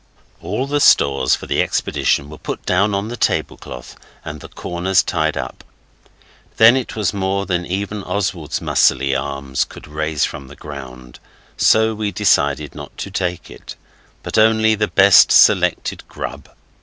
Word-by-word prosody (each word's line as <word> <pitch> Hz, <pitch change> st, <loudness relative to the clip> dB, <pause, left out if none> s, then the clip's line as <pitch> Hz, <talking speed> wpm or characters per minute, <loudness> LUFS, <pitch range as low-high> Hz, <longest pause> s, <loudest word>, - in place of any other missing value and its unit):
All 105 Hz, +10 st, -3 dB
the 145 Hz, +1 st, -1 dB
stores 70 Hz, -, +4 dB
for -, -, -10 dB
the -, -, 0 dB
expedition 70 Hz, -, 0 dB
were 75 Hz, -, -11 dB
put -, -, -6 dB
down 100 Hz, +3 st, +1 dB
on 100 Hz, +2 st, -3 dB
the 120 Hz, -, -5 dB
tablecloth 60 Hz, -, -3 dB, 0.3 s
and 75 Hz, 0 st, -7 dB
the -, -, -10 dB
corners 90 Hz, +2 st, 0 dB
tied 80 Hz, 0 st, -1 dB
up. -, -, -6 dB, 0.9 s
Then 115 Hz, +2 st, +7 dB
it 130 Hz, -2 st, -3 dB
was 105 Hz, -4 st, -1 dB
more 100 Hz, 0 st, -1 dB
than 90 Hz, -2 st, -2 dB
even 100 Hz, +3 st, -3 dB
Oswald's 90 Hz, -5 st, -3 dB
muscley 70 Hz, +1 st, +2 dB
arms 70 Hz, 0 st, -2 dB
could -, -, -12 dB
raise 75 Hz, 0 st, -1 dB
from 70 Hz, -, -8 dB
the 70 Hz, -, -13 dB
ground, 65 Hz, -5 st, -10 dB, 0.4 s
so 110 Hz, 0 st, +3 dB
we 105 Hz, -1 st, -3 dB
decided 75 Hz, -8 st, +1 dB
not -, -, -11 dB
to 100 Hz, -, -6 dB
take 90 Hz, -3 st, -3 dB
it, -, -, -11 dB, 0.5 s
but -, -, -1 dB
only 110 Hz, 0 st, +4 dB
the 105 Hz, 0 st, 0 dB
best 100 Hz, -1 st, +6 dB
selected -, -, +3 dB
grub. -, -, -8 dB
90 Hz, 155 wpm, -18 LUFS, 70-105 Hz, 0.9 s, Then